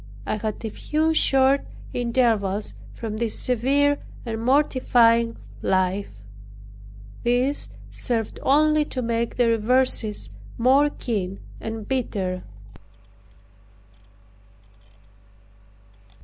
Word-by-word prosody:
I -, -, -1 dB
had 215 Hz, +1 st, -4 dB
a -, -, -2 dB
few 315 Hz, +6 st, 0 dB
short 270 Hz, -2 st, +4 dB, 0.3 s
intervals 230 Hz, -5 st, +1 dB, 0.2 s
from 220 Hz, -2 st, -5 dB
this 230 Hz, -1 st, 0 dB
severe 280 Hz, +4 st, +2 dB, 0.3 s
and 225 Hz, -1 st, -4 dB
mortifying 240 Hz, -4 st, +3 dB, 0.2 s
life. 190 Hz, +1 st, 0 dB, 1.1 s
These 250 Hz, +4 st, +1 dB, 0.2 s
served 230 Hz, -4 st, -3 dB
only 305 Hz, +2 st, +4 dB
to 255 Hz, -3 st, -4 dB
make 230 Hz, 0 st, -1 dB
the 245 Hz, -1 st, +3 dB
reverses 230 Hz, -1 st, +1 dB, 0.3 s
more 270 Hz, +5 st, +4 dB
keen 200 Hz, -9 st, -3 dB, 0.2 s
and 225 Hz, -1 st, -6 dB
bitter. 195 Hz, -8 st, -2 dB
235 Hz, 85 wpm, -24 LUFS, 220-265 Hz, 1.1 s, short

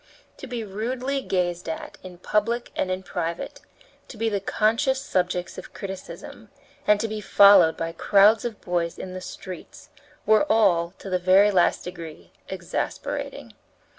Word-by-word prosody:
To 270 Hz, -, -9 dB
be 240 Hz, -2 st, -4 dB
rudely 250 Hz, +7 st, -3 dB
gazed 175 Hz, -6 st, -2 dB
at 160 Hz, -, -6 dB
in 180 Hz, -1 st, -11 dB
public 230 Hz, +6 st, -1 dB
and 185 Hz, 0 st, -2 dB
private, 170 Hz, -1 st, -4 dB, 0.5 s
to 235 Hz, -, -11 dB
be 225 Hz, +1 st, 0 dB
the 205 Hz, -2 st, -1 dB
conscious 230 Hz, +7 st, +1 dB
subjects 180 Hz, -8 st, -2 dB
of -, -, -13 dB
criticism, 190 Hz, -2 st, -8 dB, 0.4 s
and 210 Hz, -1 st, +5 dB
to 225 Hz, -, -1 dB
be 215 Hz, -1 st, -5 dB
followed 195 Hz, -5 st, +6 dB
by 165 Hz, 0 st, -3 dB
crowds 205 Hz, +5 st, +4 dB
of 230 Hz, -3 st, -5 dB
boys 170 Hz, -2 st, -2 dB
in 185 Hz, -, -7 dB
the 185 Hz, -, -6 dB
streets, 185 Hz, -1 st, -10 dB, 0.4 s
were 220 Hz, +7 st, +4 dB
all, 175 Hz, -5 st, +3 dB
to 195 Hz, -, -9 dB
the 185 Hz, -, +1 dB
very 190 Hz, +3 st, +5 dB
last 180 Hz, -3 st, +2 dB
degree, 165 Hz, -, -9 dB, 0.2 s
exasperating. -, -, -4 dB
195 Hz, 150 wpm, -24 LUFS, 180-220 Hz, 0.5 s, followed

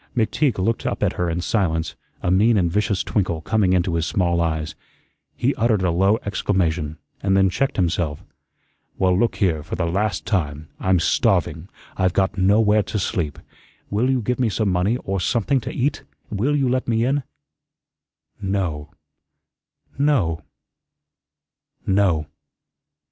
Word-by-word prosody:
McTeague 125 Hz, +4 st, +1 dB
looked 105 Hz, +5 st, 0 dB
up -, -, -2 dB
at -, -, +1 dB
her 90 Hz, -1 st, -1 dB
in 85 Hz, +1 st, -2 dB
silence, 85 Hz, -5 st, 0 dB, 0.3 s
a 90 Hz, -, +1 dB
mean 105 Hz, +4 st, +4 dB
and 85 Hz, -3 st, +1 dB
vicious 105 Hz, 0 st, 0 dB
twinkle 90 Hz, -6 st, -1 dB
coming 100 Hz, -1 st, +1 dB
into 90 Hz, -1 st, +1 dB
his 85 Hz, -1 st, 0 dB
small 85 Hz, -1 st, +1 dB
eyes. 80 Hz, -1 st, -1 dB, 0.6 s
He 135 Hz, +4 st, +1 dB
uttered 110 Hz, -5 st, +1 dB
a 90 Hz, -, +2 dB
low 95 Hz, +5 st, +3 dB
exclamation, 85 Hz, -6 st, -1 dB, 0.2 s
and 95 Hz, -1 st, +2 dB
then 95 Hz, -1 st, +4 dB
checked 135 Hz, +8 st, 0 dB
himself. 85 Hz, -5 st, -1 dB, 0.7 s
"Well, 90 Hz, -1 st, +3 dB
look 115 Hz, +5 st, +1 dB
here, 85 Hz, -7 st, +1 dB
for 80 Hz, -, -5 dB
the 85 Hz, -, -1 dB
last 100 Hz, +3 st, -1 dB
time. 75 Hz, -6 st, -2 dB
I'm 95 Hz, -1 st, +2 dB
starving. 85 Hz, +1 st, +1 dB, 0.3 s
I've 95 Hz, -2 st, +2 dB
got 95 Hz, +1 st, +1 dB
nowhere 105 Hz, +3 st, +4 dB
to 105 Hz, -, -4 dB
sleep. 90 Hz, -6 st, -2 dB, 0.5 s
Will 110 Hz, +6 st, +1 dB
you 130 Hz, -3 st, +1 dB
give 125 Hz, +3 st, -1 dB
me 120 Hz, -3 st, +2 dB
some 105 Hz, -1 st, 0 dB
money, 90 Hz, +7 st, +1 dB
or 95 Hz, 0 st, -2 dB
something 120 Hz, +8 st, +1 dB
to -, -, -5 dB
eat? 140 Hz, +3 st, -1 dB, 0.3 s
Will 120 Hz, +8 st, 0 dB
you 135 Hz, -3 st, +1 dB
let 130 Hz, +1 st, 0 dB
me 115 Hz, 0 st, +1 dB
in?" 140 Hz, +3 st, +1 dB, 1.2 s
"No 90 Hz, -7 st, -2 dB, 1.1 s
no 120 Hz, -, +2 dB, 1.4 s
no." 95 Hz, -6 st, +2 dB
95 Hz, 150 wpm, -22 LUFS, 85-110 Hz, 1.4 s, mean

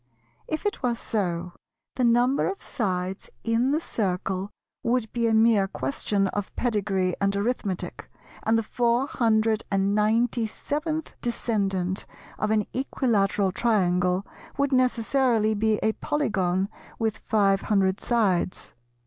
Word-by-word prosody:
If 315 Hz, +6 st, -3 dB
it 415 Hz, -, -1 dB
were 245 Hz, -2 st, +1 dB
so, 180 Hz, -6 st, -2 dB, 0.4 s
the 255 Hz, -, -1 dB
number 245 Hz, +3 st, +3 dB
of 390 Hz, 0 st, -4 dB
sides 185 Hz, -4 st, -2 dB
in 230 Hz, +3 st, +2 dB
the 295 Hz, +3 st, +2 dB
Circle 190 Hz, -, -2 dB, 0.3 s
would 235 Hz, -2 st, 0 dB
be 235 Hz, -1 st, +1 dB
a 225 Hz, -, +2 dB
mere 220 Hz, -3 st, +4 dB
question 195 Hz, +7 st, -1 dB
of 205 Hz, 0 st, -4 dB
pedigree 195 Hz, -6 st, 0 dB
and 200 Hz, 0 st, +2 dB
arithmetic, 200 Hz, -3 st, -2 dB, 0.3 s
and 225 Hz, +1 st, +2 dB
the 225 Hz, -, 0 dB
four 240 Hz, +3 st, +1 dB
hundred 225 Hz, -4 st, +2 dB
and 195 Hz, -1 st, +1 dB
ninety 225 Hz, +2 st, +2 dB
seventh 305 Hz, +7 st, -3 dB
descendant 195 Hz, -6 st, -1 dB, 0.3 s
of 215 Hz, -, 0 dB
an 215 Hz, -1 st, +2 dB
Equilateral 210 Hz, -7 st, +1 dB
Triangle 180 Hz, -3 st, +1 dB, 0.3 s
would 280 Hz, 0 st, +1 dB
necessarily 250 Hz, -3 st, +2 dB
be 215 Hz, 0 st, +1 dB
a 220 Hz, -, +3 dB
polygon 195 Hz, -12 st, 0 dB, 0.3 s
with 220 Hz, -2 st, -1 dB
five 195 Hz, -3 st, +2 dB
hundred 195 Hz, -2 st, +1 dB
sides. 200 Hz, -7 st, 0 dB
215 Hz, 130 wpm, -26 LUFS, 195-240 Hz, 0.4 s, mere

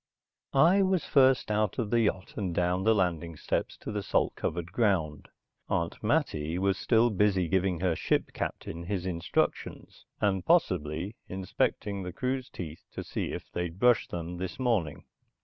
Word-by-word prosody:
I 170 Hz, +8 st, +6 dB
was 190 Hz, -2 st, +1 dB
first 130 Hz, -5 st, +4 dB
out 105 Hz, -2 st, +1 dB
of 110 Hz, -4 st, -2 dB
the 120 Hz, -1 st, +4 dB
yacht 95 Hz, -3 st, -1 dB
and 95 Hz, -5 st, -2 dB
down 90 Hz, +2 st, +1 dB
the 110 Hz, 0 st, +5 dB
landing 85 Hz, -4 st, 0 dB
steps -, -, -2 dB
to -, -, -5 dB
the 105 Hz, -1 st, -2 dB
salt -, -, +1 dB
covered 85 Hz, +1 st, -3 dB
ground. 90 Hz, -10 st, 0 dB, 0.4 s
Aunt 85 Hz, 0 st, -1 dB
Mattie 90 Hz, -, 0 dB
was 95 Hz, +1 st, +1 dB
still 120 Hz, 0 st, +3 dB
busy 95 Hz, -3 st, +2 dB
giving 95 Hz, 0 st, +1 dB
her 90 Hz, -3 st, +2 dB
ship -, -, 0 dB
captain 85 Hz, -, -4 dB
his 95 Hz, -1 st, -2 dB
instructions, 85 Hz, -2 st, -2 dB
and 95 Hz, -3 st, +1 dB
possibly 90 Hz, -, +1 dB
inspecting 95 Hz, +2 st, -1 dB
the 90 Hz, -1 st, -5 dB
crew's 130 Hz, +5 st, -2 dB
teeth 80 Hz, -3 st, -8 dB
to -, -, -5 dB
see -, -, -3 dB
if -, -, -7 dB
they'd 90 Hz, -1 st, -3 dB
brushed 120 Hz, +1 st, +4 dB
them 85 Hz, 0 st, -5 dB
this 95 Hz, 0 st, -5 dB
morning. 110 Hz, -, 0 dB
95 Hz, 165 wpm, -29 LUFS, 85-110 Hz, 0.4 s, I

